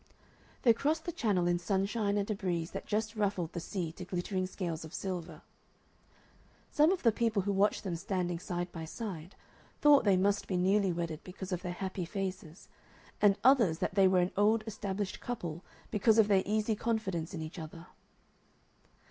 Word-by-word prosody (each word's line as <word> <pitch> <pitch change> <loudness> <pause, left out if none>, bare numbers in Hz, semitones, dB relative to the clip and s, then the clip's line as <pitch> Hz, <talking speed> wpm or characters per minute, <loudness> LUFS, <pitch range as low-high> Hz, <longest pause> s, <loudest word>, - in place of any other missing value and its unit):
They 235 - +7
crossed 310 +7 -1
the 345 - -2
Channel 200 - +1
in 175 0 +2
sunshine 200 +3 0
and 200 -1 0
a - - +2
breeze 175 -4 -2
that - - -6
just 215 +1 -1
ruffled 195 -6 -1
the 170 - -3
sea 170 -1 -4
to 180 - -9
glittering 185 +1 -2
scales 170 -4 -4
of 160 +1 -9
silver. 180 -3 -5 1.3
Some 305 +3 +5
of 375 - -1
the 230 - +6
people 220 -3 0
who 200 - 0
watched 200 +1 +2
them 185 -4 -2
standing 175 -1 -2
side 175 0 -4
by 165 - -6
side 180 -2 -6 0.4
thought 295 -1 +6
they 200 -4 +4
must 200 +2 +1
be 185 - -1
newly 190 +1 +3
wedded 165 -2 -4
because 185 +1 -8
of 180 -1 -1
their 180 -2 -4
happy 190 0 -4
faces, 185 -2 -5 0.5
and 205 -1 +5
others 235 -11 +5
that - - -2
they 195 -1 +5
were 185 -1 +4
an 180 - 0
old 215 +2 +3
established 205 -2 -4
couple 175 -8 -5 0.3
because 215 +1 +3
of 220 -2 +6
their 195 -2 +5
easy 215 +1 +1
confidence 195 -7 -2
in 160 - -4
each 160 +3 -7
other. 165 +1 -9
190 Hz, 180 wpm, -32 LUFS, 175-210 Hz, 1.3 s, They